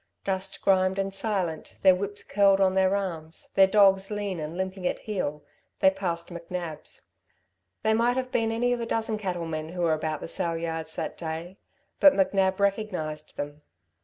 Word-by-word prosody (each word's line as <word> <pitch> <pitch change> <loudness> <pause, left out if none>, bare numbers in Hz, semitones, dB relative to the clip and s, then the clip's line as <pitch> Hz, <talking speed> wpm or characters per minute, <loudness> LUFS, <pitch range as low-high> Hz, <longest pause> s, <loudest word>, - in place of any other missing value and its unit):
Dust 190 0 -3
grimed 190 -1 +3
and 195 0 -1
silent, 190 -6 -2
their 190 -1 +8
whips 200 +2 -3
curled 200 -1 +4
on 190 -1 +4
their 190 +1 +3
arms, 165 -5 -5
their 195 0 +6
dogs 195 -1 +4
lean 205 -4 -3
and 155 +2 -5
limping 190 -1 -2
at - - -2
heel, 150 -8 -3 0.4
they 190 - +6
passed 180 -3 -3
McNab's. 170 -2 -6 0.8
They 220 - +3
might 240 +3 +2
have 255 -1 -2
been 225 -1 +1
any 245 +2 +1
of 245 - -2
a 230 - -3
dozen 220 -1 -1
cattle 180 -4 -2
men 155 -1 -4
who 175 +1 -3
were 165 -2 +3
about 155 -1 -2
the - - -5
sale 165 0 -1
yards 165 -1 -4
that - - -4
day; 170 +4 -5 0.4
but 290 - +8
McNab 190 0 +2
recognised 190 -7 -2
them. 145 +1 -5
190 Hz, 180 wpm, -27 LUFS, 165-200 Hz, 0.8 s, their